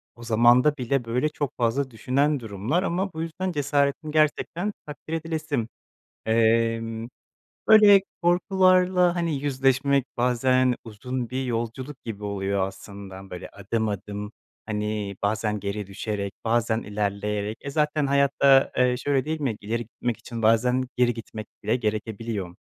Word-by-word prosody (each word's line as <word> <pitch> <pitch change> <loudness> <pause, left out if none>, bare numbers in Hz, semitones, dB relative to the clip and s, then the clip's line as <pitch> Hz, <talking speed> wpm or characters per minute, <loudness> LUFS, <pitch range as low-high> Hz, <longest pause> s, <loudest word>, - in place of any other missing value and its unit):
o 120 - -12
zamanda 120 +6 +4
bile, 125 0 -1
böyle, 125 +6 0
çok 145 -3 -3
fazla 130 +3 0
düşünen 140 +5 +1
durumlar 115 - -1
ama 190 +2 -1
bu 160 - -4
yüzden 175 +3 -3
cesaretin 145 0 0
gerçekten 155 +6 +1
takdir 150 +2 -8
edilesi. 155 -6 -2 0.6
Emm, 115 0 +1 0.6
böyle, 210 -2 +8 0.2
korkularla, 180 0 +3
hani, 170 -3 -1
yüzleşmek 135 0 +2
bazen 125 +1 +2
uzun 120 +2 -5
bir 130 +1 -2
yolculuk 125 +3 -4
gibi 105 -3 -6
oluyor 100 -1 -1
aslında, 95 -1 -11
böyle, 90 +1 -7
adım 110 +2 -2
adım, 105 +1 -5 0.3
hani, 105 -2 -3
bazen 105 0 0
geri 100 +1 -4
düşerek, 100 0 -4
bazen 115 0 +1
ilerleyerek, 105 +1 -2
e, 140 - -6
zaten 150 0 +1
hayatta, 140 -1 +4
eee, 125 -1 +3
şöyle 135 +1 0
değil 155 +1 -3
mi, 130 -7 -1
ileri 115 +3 -2
gitmek 120 +1 -4
için 115 -2 -7
bazen 125 +4 +3
geri 120 -1 +3
gitmek 110 -2 -8 0.2
bile - - +1
gerekebiliyor. 110 -4 -3
120 Hz, 135 wpm, -25 LUFS, 110-145 Hz, 0.6 s, böyle